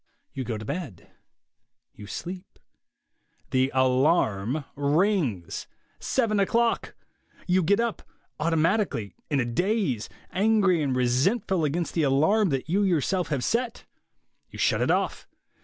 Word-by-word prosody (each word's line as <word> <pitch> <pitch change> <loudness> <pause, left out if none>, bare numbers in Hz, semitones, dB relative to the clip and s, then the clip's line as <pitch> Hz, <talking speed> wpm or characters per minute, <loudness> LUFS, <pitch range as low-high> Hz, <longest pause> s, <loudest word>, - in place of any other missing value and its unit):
You 130 - -4
go 115 -3 -3
to 110 - -8
bed; 140 - -6 0.8
you 105 - -11
sleep... 180 - -7 0.9
The 130 +1 +2
alarm 130 - +2
rings. 145 - 0 0.3
Seven 225 -5 0
o'clock! 230 +4 +1 0.5
You 185 +1 +3
get 200 +5 +2
up, 235 -1 -1 0.4
automatically, 165 - 0 0.2
in 145 -3 +1
a 120 - +1
daze, 150 - -1 0.2
angry 195 -3 +3
and 135 -3 0
resentful 160 - +1
against 165 +4 -2
the 165 - +1
alarm 160 +9 +3
that 135 -1 -2
you 190 +5 +1
yourself 180 -1 +1
have 140 -5 -2
set. 240 +1 -1 0.6
You - - -11
shut - - +2
it - - +1
off. - - 0
160 Hz, 125 wpm, -26 LUFS, 130-195 Hz, 0.9 s, You